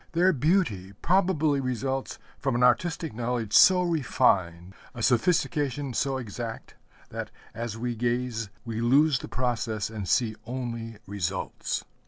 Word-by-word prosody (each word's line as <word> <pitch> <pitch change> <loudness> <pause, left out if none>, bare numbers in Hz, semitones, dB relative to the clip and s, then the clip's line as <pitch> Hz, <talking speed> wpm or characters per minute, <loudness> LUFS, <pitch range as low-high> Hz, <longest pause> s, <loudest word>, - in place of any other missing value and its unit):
Their 180 +3 +4
beauty 140 - +1
probably 160 -5 +2
results 130 +1 -2 0.2
from 135 -3 -1
an 120 - +2
artistic 160 +5 +2
knowledge 115 -2 -2
so 185 -1 +7
refined, 95 - +1 0.2
a 115 - -5
sophistication 145 +1 +1
so 135 +2 0
exact, 115 -1 -6 0.4
that, - - -5 0.2
as 115 -1 -5
we 120 +1 -3
gaze, 120 -1 -1 0.2
we 115 -1 -3
lose 135 +3 +4
the - - -7
process 115 -4 -2
and 105 -5 -5
see 115 -4 +2
only 115 -3 -5
results. 95 -2 -3
125 Hz, 130 wpm, -27 LUFS, 115-145 Hz, 0.4 s, so